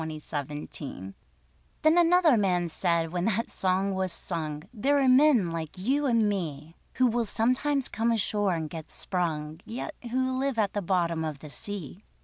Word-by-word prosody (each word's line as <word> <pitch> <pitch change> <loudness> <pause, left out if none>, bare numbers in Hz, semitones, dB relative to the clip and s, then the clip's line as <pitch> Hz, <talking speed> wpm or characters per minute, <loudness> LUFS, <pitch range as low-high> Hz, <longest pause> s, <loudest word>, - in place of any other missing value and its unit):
THE 155 -2 -4
MERMAN 140 - -7 0.7
Then 310 +1 +5
another 345 -3 +5
man 180 -5 +1
said 165 0 0
when 175 0 -1
that 225 +1 0
song 190 +1 0
was 190 -1 -1
sung: 155 -4 -4
There 275 +6 +2
are 270 - +3
men 255 - +5
like 165 -1 -5
you 270 +10 +1
and 230 -4 +3
me, 165 -5 -3 0.2
Who 255 - +3
will 235 -1 +1
sometimes 255 +6 +1
come 230 +1 0
ashore 205 -4 +1
and 160 -1 -3
get 160 0 -8
sprung, 160 -3 -3
Yet 240 +7 -5 0.2
who 260 +1 0
live 270 -2 -1
at 205 -3 +1
the 205 - -1
bottom 170 -3 0
of 155 -2 -3
the 150 +1 -11
sea. 200 +1 -6
190 Hz, 170 wpm, -28 LUFS, 165-240 Hz, 0.7 s, Then